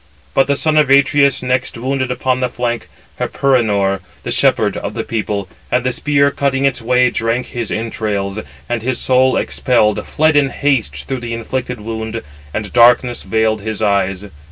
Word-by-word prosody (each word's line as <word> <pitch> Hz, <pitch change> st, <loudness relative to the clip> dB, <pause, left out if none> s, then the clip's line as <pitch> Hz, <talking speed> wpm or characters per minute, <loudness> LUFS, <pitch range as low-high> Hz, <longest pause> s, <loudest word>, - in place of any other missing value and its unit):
But 135 Hz, -, +3 dB
the 140 Hz, -, +2 dB
son 155 Hz, +2 st, +1 dB
of 150 Hz, -3 st, +4 dB
Atreus 140 Hz, 0 st, +4 dB
next 125 Hz, -1 st, -1 dB
wounded 130 Hz, +1 st, -2 dB
upon 125 Hz, 0 st, 0 dB
the 125 Hz, -1 st, 0 dB
flank 120 Hz, -1 st, -3 dB, 0.3 s
Hyperenor, 105 Hz, -8 st, +1 dB, 0.2 s
the -, -, -4 dB
shepherd -, -, +2 dB
of -, -, -5 dB
the -, -, -2 dB
people, 105 Hz, -3 st, -3 dB, 0.2 s
and 125 Hz, 0 st, +1 dB
the 125 Hz, -, 0 dB
spear, 140 Hz, +2 st, +2 dB
cutting 140 Hz, -1 st, 0 dB
its 135 Hz, -3 st, +1 dB
way, 125 Hz, +1 st, +3 dB
drank 115 Hz, +2 st, -1 dB
his 120 Hz, -3 st, -4 dB
entrails; 110 Hz, -3 st, -3 dB, 0.3 s
and 120 Hz, -2 st, -2 dB
his 125 Hz, +2 st, -1 dB
soul, 130 Hz, 0 st, +3 dB
expelled, 110 Hz, -5 st, +1 dB
fled 155 Hz, 0 st, +2 dB
in 145 Hz, -2 st, +4 dB
haste 135 Hz, -4 st, -1 dB
through 135 Hz, -2 st, -3 dB
the 120 Hz, -1 st, -4 dB
inflicted 125 Hz, 0 st, -4 dB
wound, 110 Hz, +1 st, -5 dB, 0.3 s
and 105 Hz, +3 st, -5 dB
darkness 120 Hz, 0 st, +4 dB
veiled 110 Hz, -1 st, 0 dB
his 110 Hz, 0 st, -3 dB
eyes. 100 Hz, -1 st, 0 dB
120 Hz, 170 wpm, -17 LUFS, 110-130 Hz, 0.3 s, of